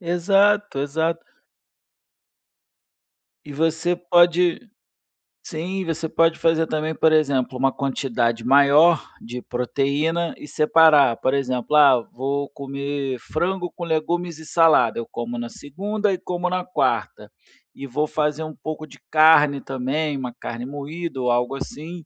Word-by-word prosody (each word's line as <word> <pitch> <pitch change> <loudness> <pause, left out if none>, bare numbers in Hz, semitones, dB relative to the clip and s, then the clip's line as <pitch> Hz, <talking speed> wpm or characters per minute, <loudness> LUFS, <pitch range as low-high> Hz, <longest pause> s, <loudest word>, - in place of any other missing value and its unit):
Exato, 195 0 +1
exato. 160 +4 -2 2.2
E 145 - -10
você 165 +3 0
pode 175 0 +3 0.9
Sim, 185 +4 -4
você 165 0 -3
pode 165 +1 +2
fazer 165 -1 +1
também, 155 +1 -2
por 160 0 +2
exemplo, 140 -5 +1
uma 135 +1 +2
quantidade 120 -4 -2
maior 145 +5 +5 0.2
de 120 +2 -8
proteína 140 +7 -1
e 150 - -11
separar, 150 -6 +4
por 130 - 0
exemplo: 130 0 -1
"Ah, 140 -4 +6
vou 140 +2 -2
comer 140 -1 -4
frango 175 +6 -3
com 175 - -7
legumes 170 +1 -2
e 160 - -12
salada, 155 -9 +3
eu 115 - -6
como 120 0 -5
na 120 0 -5
segunda 205 +7 -3
e 185 - -2
como 180 0 -3
na 180 0 -1
quarta. 135 -11 -2 0.5
E 140 - -8
vou 150 +5 -1
fazer 150 0 -2
um 155 -1 -8
pouco 155 0 -6
de 145 - -17
carne 155 -2 +5
também, 140 +3 -2
uma 125 -2 -5
carne 115 0 -7
moída 145 +2 -6
ou 125 -1 0
algo 125 +3 0
assim, 160 +4 -8
150 Hz, 140 wpm, -22 LUFS, 135-165 Hz, 2.2 s, Ah